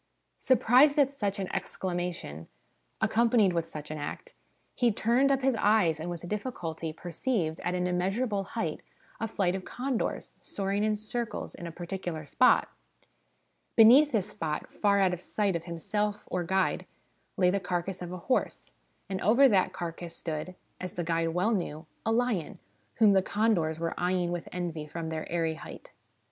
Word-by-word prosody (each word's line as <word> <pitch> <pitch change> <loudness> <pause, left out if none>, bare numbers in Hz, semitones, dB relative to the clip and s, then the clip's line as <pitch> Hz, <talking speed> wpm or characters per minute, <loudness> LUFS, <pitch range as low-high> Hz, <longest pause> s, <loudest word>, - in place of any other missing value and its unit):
' - - -49
Surprised 260 +3 +5
at 280 -2 +4
such 205 -8 -2
an 195 - -2
excla 185 -2 -3
mation, 170 - -4 0.5
accompanied 225 -4 +3
with 165 -1 -1
such 150 -2 -8
an 155 - -4
act, 480 - -6 0.4
he 240 -2 +2
turned 240 +6 +2
up 270 -1 +1
his 265 -2 +3
eyes, 205 -7 +3
and 165 +3 -4
with 175 0 -6
difficulty 175 -7 -4
perceived, 170 - -2
at 180 - -2
an 180 0 0
immeasurable 195 +4 0
height, 180 -5 -3 0.4
a 225 - -1
flight 195 -4 0
of 190 -1 -4
condors, 255 +2 -3
soaring 200 +1 -2
in 215 0 +2
circles 220 +2 -4
in 170 - -7
a - - -6
particular 175 -2 -5
spot. 250 - +4 1.1
Beneath 255 +7 +8
this 210 -3 0
spot, 155 -6 -3
far 200 -1 +2
out 190 -2 +3
of 180 - -5
sight 200 -1 0
of 170 - -3
himself 205 +5 -2
or 180 -1 -2
guide, 190 +2 0 0.5
lay 180 -1 +4
the 200 - +1
carcass 180 0 -3
of 175 -1 -5
a 180 - -5
horse, 255 +9 -1 0.4
and 190 -1 -3
over 240 +8 +6
that 195 -6 +3
carcass 170 0 -6
stood, 160 +2 -5 0.2
as 185 -1 -5
the 175 - -3
guide 165 0 0
well 180 +7 +1
knew, 165 -6 -2 0.2
a - - +3
lion, 225 -7 0 0.4
whom 215 -3 +5
the 190 - +5
condors 190 -6 +1
were 165 0 -1
eyeing 180 -1 +1
with 175 -1 -4
envy 170 -4 -4
from 165 +1 -5
their 160 -1 -5
airy 165 -2 0
height. 160 - -11
185 Hz, 175 wpm, -29 LUFS, 170-220 Hz, 1.1 s, Beneath